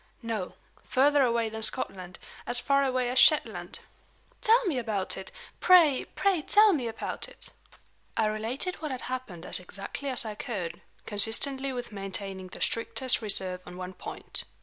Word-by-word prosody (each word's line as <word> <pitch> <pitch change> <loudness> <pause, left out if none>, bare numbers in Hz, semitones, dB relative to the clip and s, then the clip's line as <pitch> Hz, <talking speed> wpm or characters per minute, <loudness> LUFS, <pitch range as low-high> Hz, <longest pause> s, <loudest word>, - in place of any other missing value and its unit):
"No. 220 -5 -4 0.3
Further 285 +2 +3
away 235 -3 +2
than 220 0 -6
Scotland 185 -6 +1 0.3
as 245 0 +4
far 280 +2 +2
away 255 -2 0
as 255 - +3
Shetland." 305 - +3 0.6
"Tell 465 +2 +4
me 305 -9 0
about 215 -5 -2
it! 190 - -8 0.3
Pray, 330 -7 +6
pray 390 -5 +2
tell 415 +6 +5
me 260 -7 -1
about 225 - -3
it!" - - -4 0.7
I 220 - +3
related 225 +11 -2
what 310 - -5
had 260 -2 -4
happened 250 -10 -6
as - - +2
exactly 195 +9 -6
as 255 -2 +4
I 215 - -4
could, 205 -6 -5 0.2
consistently 265 +6 0
with 245 -2 -5
maintaining 195 -1 -5
the - - -11
strictest 250 +2 +2
reserve 190 -4 -1
on 180 - -10
one 185 0 -6
point. - - -3
235 Hz, 160 wpm, -28 LUFS, 200-275 Hz, 0.7 s, Pray